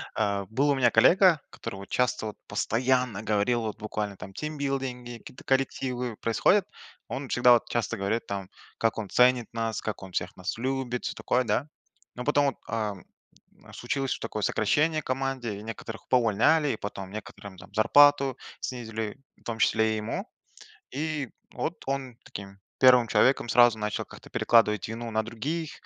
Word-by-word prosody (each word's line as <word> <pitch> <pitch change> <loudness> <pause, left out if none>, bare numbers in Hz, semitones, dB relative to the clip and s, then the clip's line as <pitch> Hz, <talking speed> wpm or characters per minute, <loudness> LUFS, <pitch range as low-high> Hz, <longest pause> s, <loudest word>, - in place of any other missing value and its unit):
да. 100 -1 0
Э, - - -12
был 140 +6 +1
у 140 - +4
меня 125 -3 +3
коллега, 170 - +5
который 115 - -7
вот 100 0 -10
часто, 125 -2 0
вот 105 - -7
постоянно 125 -2 0
говорил, 110 +3 +1
вот 110 -2 -4
буквально 105 -1 -4
там 95 +1 -9
тимбилдинги 135 -4 -4
какие-то 125 - -13
коллективы 125 -3 -1
происходят, 180 - +3 0.4
он 135 0 -5
всегда 125 0 +6
вот 120 - +2
часто 115 -1 -1
говорит 100 +4 -1
там, 100 -2 -4 0.3
как 115 -1 +1
он 105 -3 -5
ценит 125 -2 +4
нас, 115 -1 -2
как 110 -3 -5
он 95 - -9
всех - - -3
нас 90 +4 -4
любит, 130 0 -2
всё - - -2
такое, 125 +1 +1
да? 115 +6 0 0.5
Но 125 - -5
потом 145 +1 +3
вот, 135 - -1
э, 110 -2 -1 0.8
случилось 135 +2 -2
такое 110 -2 -4
сокращение 155 +8 +2
в - - -25
команде, 130 -4 -2
и - - -10
некоторых 115 0 -8
поувольняли, 125 +6 +3
и 115 - -1
потом 95 -2 -6
некоторым 100 -2 -9
там 95 - -14
зарплату 135 +4 +5 0.2
снизили, 110 -3 -4 0.2
в - - -27
том 115 -1 -4
числе 110 -2 +3
и - - -1
ему, 105 +1 -3 0.7
и 150 -2 -3 0.2
вот 165 - -2
он 135 -3 -3
таким 100 0 -9 0.2
первым 125 -2 +7
человеком 130 +1 +3
сразу 120 -2 +5
начал 105 0 -2
как-то - - -14
перекладывать 105 -4 +3
вину 115 +1 -5
на 110 0 +1
других, 145 +9 -4
120 Hz, 170 wpm, -27 LUFS, 110-135 Hz, 0.8 s, первым